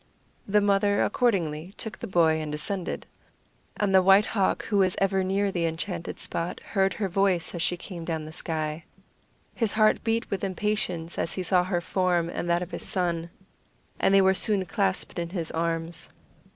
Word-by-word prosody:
The 210 +1 +3
mother 205 0 +3
accordingly 185 -7 0
took 220 - -5
the - - -5
boy 160 -4 +3
and 155 -1 -4
descended. 175 +5 -3 0.7
And 205 -3 +1
the 190 - +7
White 195 +3 +6
Hawk, 195 -3 0
who 205 -3 +1
was 185 -2 +3
ever 195 -1 +2
near 195 +1 +1
the 170 -3 0
enchanted 170 +1 -4
spot, 170 +1 -3
heard 195 -3 0
her 205 - -1
voice 190 -2 +1
as 170 - -3
she 175 +1 +1
came 175 -2 -7
down 160 -2 -3
the 155 - -8
sky. 155 0 -3 0.7
His 225 -4 0
heart 215 0 +3
beat 230 0 -1
with 195 - -2
impatience 185 -4 -2
as - - -1
he 185 - -3
saw 180 0 +3
her 180 -2 -1
form 175 -1 +1
and 175 - -4
that 170 +1 +2
of 180 - -9
his - - -5
son, 170 -3 -1 0.7
and - - +3
they 195 0 +6
were 190 0 +5
soon 195 0 +2
clasped 195 -3 -1
in 170 0 -3
his 170 -3 -3
arms. 165 0 -1
185 Hz, 185 wpm, -26 LUFS, 170-195 Hz, 0.7 s, the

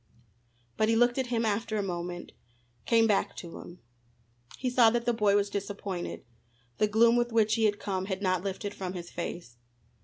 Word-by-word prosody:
But 215 - +2
he 225 - +3
looked 240 +2 +3
at 260 - -1
him 235 -1 0
after 215 +1 -1
a 205 - 0
moment, 175 -1 -5 0.6
came 230 -1 +5
back 210 -3 +1
to 170 -2 -8
him. 175 +1 -12 0.8
He 255 - -3
saw 245 -2 +5
that 235 +1 -1
the 240 - +2
boy 210 -3 +3
was 200 0 +1
disappointed. 200 -2 -5 0.5
The 210 - +4
gloom 230 +3 +4
with 240 0 +1
which 220 -1 +3
he 225 0 +2
had 205 -1 +2
come 190 -2 -2
had 190 -1 -3
not 185 -3 0
lifted 200 +1 -4
from 185 -1 -5
his 175 -2 -7
face. 170 -7 -6
205 Hz, 190 wpm, -29 LUFS, 185-230 Hz, 0.8 s, came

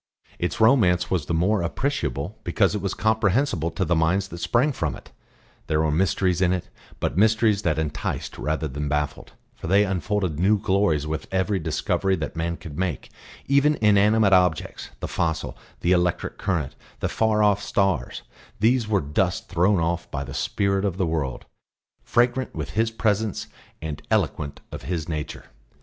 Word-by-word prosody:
Its 90 - -2
romance 95 -7 +4
was 90 -4 0
the - - -1
more 95 +4 +2
appreciable 100 - -2
because 95 -2 +2
it 105 - -2
was 100 -1 -2
comprehensible 110 - +1
to 95 +3 -2
the 85 +1 +1
minds 90 +5 +1
that 85 - -8
sprang 125 - +2
from 85 - -2
it; - - -14 0.6
there 80 -1 +1
were 80 -1 +2
mysteries 90 +2 +1
in 90 -1 +3
it, 90 -2 -2 0.3
but 90 - -1
mysteries 110 -1 +3
that 80 -7 0
enticed 80 -2 -3
rather 80 +1 -1
than 75 +1 -4
baffled, 75 0 -2 0.2
for - - -8
they 100 +4 +4
unfolded 95 -3 -1
new 100 +4 +4
glories 95 -7 +1
with 80 0 -4
every 95 +1 +1
discovery 90 +4 0
that 80 -4 -5
man 85 +1 -2
could 75 -2 -9
make; 90 -8 -3 0.3
even 140 +2 +3
inanimate 105 0 +4
objects, 90 -4 +1
the - - -2
fossil, 80 -2 -2 0.3
the 85 - +1
electric 90 -1 0
current, 85 -8 -1 0.2
the - - 0
far 110 -1 +2
off 105 -1 +3
stars, 95 -4 0 0.4
these 115 +2 +3
were 105 -3 +2
dust 85 +5 -1
thrown 90 +2 +3
off 85 +1 -1
by 70 -2 -3
the 70 0 -8
Spirit 100 +6 0
of 95 -3 -1
the 95 - +1
World 80 -6 -2 0.6
fragrant 120 +2 +1
with - - -4
His 110 +1 +1
Presence 110 -2 -1 0.4
and 75 -2 -5
eloquent 70 -2 -1
of - - -7
His 85 -3 -3
Nature. 75 -3 -5
95 Hz, 170 wpm, -24 LUFS, 80-105 Hz, 0.6 s, romance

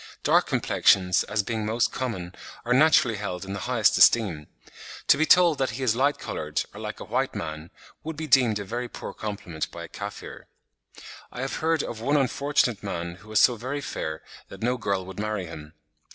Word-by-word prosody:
Dark - - +3
complexions, 90 -2 +3
as 105 0 -1
being 110 0 -3
most 115 +3 +1
common, 95 -9 -4 0.3
are 125 - +2
naturally 130 -5 +4
held 95 -2 -5
in 95 - -6
the 100 - -4
highest 115 -5 +3
esteem. 90 -11 +4 0.6
To - - +8
be 160 - +1
told 175 -5 +5
that 135 -1 +1
he 135 - -4
is 115 -3 +2
light 140 +4 +2
coloured, - - -3
or - - -10
like - - -6
a - - -6
white - - -1
man, 80 0 -6 0.3
would 160 0 -5
be 160 - -4
deemed 125 -6 +4
a 100 - -4
very 120 +4 -4
poor - - -7
compliment 100 -7 -5
by 85 - -8
a - - -8
Kaffir. 100 +3 -8 0.8
I 125 - -6
have 135 - -3
heard 160 -1 +1
of 110 -2 -6
one 145 +5 +2
unfortunate 135 -4 +1
man 85 -3 -5
who 110 +3 -17
was 110 -2 +2
so 125 - +5
very 130 +6 -4
fair 80 - -5 0.2
that 100 +2 -10
no 125 +2 +1
girl 100 -5 -2
would 95 +1 -9
marry 105 -3 -2
him." 80 -2 -10
110 Hz, 200 wpm, -26 LUFS, 95-130 Hz, 0.8 s, To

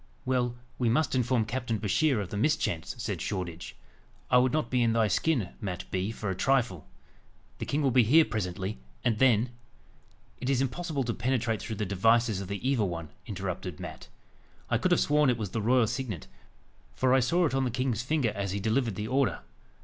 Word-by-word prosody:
"Well, 125 -2 0 0.2
we 120 -2 +2
must 145 +7 +2
inform 125 -2 +2
Captain 115 -1 -2
Bouchier 125 +6 +2
of 100 -3 -4
the - - -5
mischance," 120 - 0
said - - -3
Shoreditch. 90 -4 -4 0.6
"I 125 - +7
would 125 0 +3
not 155 0 -1
be 125 -1 +2
in 115 -1 +3
thy 115 -1 +3
skin, 115 - +1
Mat 90 -4 -4
Bee, 95 +3 -1
for 105 -3 -4
a - - -2
trifle. 120 - +1 0.7
The - - -4
king 145 +1 0
will 135 - +3
be 125 +1 +6
here 150 +8 +6
presently, 95 - -3 0.2
and 115 -3 +1
then 120 -2 +4 0.4
" - - -33
"It 125 - -2
is 135 -2 +2
impossible 140 +2 -1
to 120 -1 -2
penetrate 120 -2 0
through 110 - -4
the 105 - -2
devices 110 +2 +2
of 95 - -6
the 100 +6 -3
evil 120 -8 +2
one," 85 -3 -5 0.2
interrupted 95 -4 -4
Mat. - - -8 0.6
"I - - +3
could - - +1
have - - +4
sworn 150 -1 +3
it 125 - +2
was 105 -5 -4
the 115 - -2
royal 120 +2 +4
signet, 115 - -4 0.7
for 130 -1 +2
I 130 - +6
saw 170 +8 +2
it 150 - 0
on 135 0 +2
the 125 - 0
king's 125 -2 -1
finger 130 -3 0
as 100 -1 -3
he 100 - -1
delivered 115 +1 0
the 105 +3 -3
order. 130 +2 +1
115 Hz, 205 wpm, -29 LUFS, 100-130 Hz, 0.7 s, I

